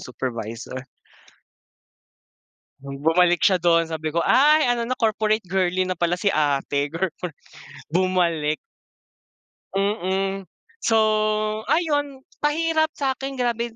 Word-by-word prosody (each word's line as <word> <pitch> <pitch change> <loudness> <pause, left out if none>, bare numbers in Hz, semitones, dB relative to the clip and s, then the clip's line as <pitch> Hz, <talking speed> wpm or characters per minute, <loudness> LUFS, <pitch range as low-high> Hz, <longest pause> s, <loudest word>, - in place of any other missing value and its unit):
supervisor. 125 0 -6 1.9
Bu 140 0 -8 0.2
Bumalik 175 0 +3
siya 185 -2 +4
doon. 170 -1 +3
Sabi 160 0 -3
ko, 170 - +2
"Ay 300 +3 +5
ano 235 -1 -1
na, 255 - -1
corporate 215 -1 +1
girly 185 0 0
na 185 -2 -4
pala 175 0 +1
si 200 +2 0
ate." 145 -1 0
Corpor 170 0 -4 0.6
bumalik. 170 -4 +1 1.2
Mm. 195 -1 -1 0.3
So, 225 - +2 0.7
ayun, 290 -5 0 0.2
pahirap 315 +1 +1
sa'kin, 270 0 -2
grabe 235 -2 -2
185 Hz, 105 wpm, -23 LUFS, 165-240 Hz, 1.9 s, Ay